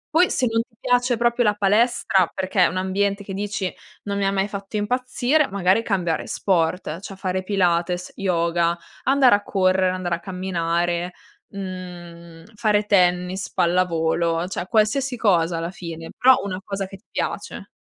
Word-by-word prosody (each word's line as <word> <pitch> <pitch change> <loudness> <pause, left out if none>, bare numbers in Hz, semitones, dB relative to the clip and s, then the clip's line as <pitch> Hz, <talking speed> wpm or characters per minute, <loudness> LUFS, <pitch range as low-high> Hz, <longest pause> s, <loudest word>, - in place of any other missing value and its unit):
Poi 360 +2 +5
se 255 - 0
non 225 0 +1
ti 230 0 -13
piace 245 -1 +1
proprio 235 +1 +2
la 210 -2 +2
palestra 205 -3 +2
perché 190 0 +1
è - - +4
un 185 - -4
ambiente 200 +2 0
che 195 - -7
dici: 200 -1 -3 0.3
"Non 200 -1 -3
mi 200 - +1
ha 195 - +1
mai 195 0 0
fatto 200 0 -7
impazzire", 250 +6 +1
magari 195 +2 +2
cambiare 180 -7 -1
sport: 170 -2 0
cioè 195 0 -8
fare 185 -1 -2
pilates, 180 -2 0
yoga, 170 -2 +1 0.3
andare 270 -3 +5
a 205 - +3
correre, 185 -2 +2
andare 185 -1 -2
a 170 - -1
camminare, 175 -1 -2 0.3
mhmm, 175 -3 -9
fare 210 -1 +1
tennis, 180 -1 +1
pallavolo, 170 -1 +1
cioè 185 -1 -4
qualsiasi 245 +4 +1
cosa 175 -6 +2
alla 165 +1 -3
fine, 165 -3 -8
però 260 +1 +6
una 185 -2 -4
cosa 195 0 -3
che 195 +1 -11
ti 205 - -34
piace. - - -4
190 Hz, 160 wpm, -22 LUFS, 175-210 Hz, 0.3 s, però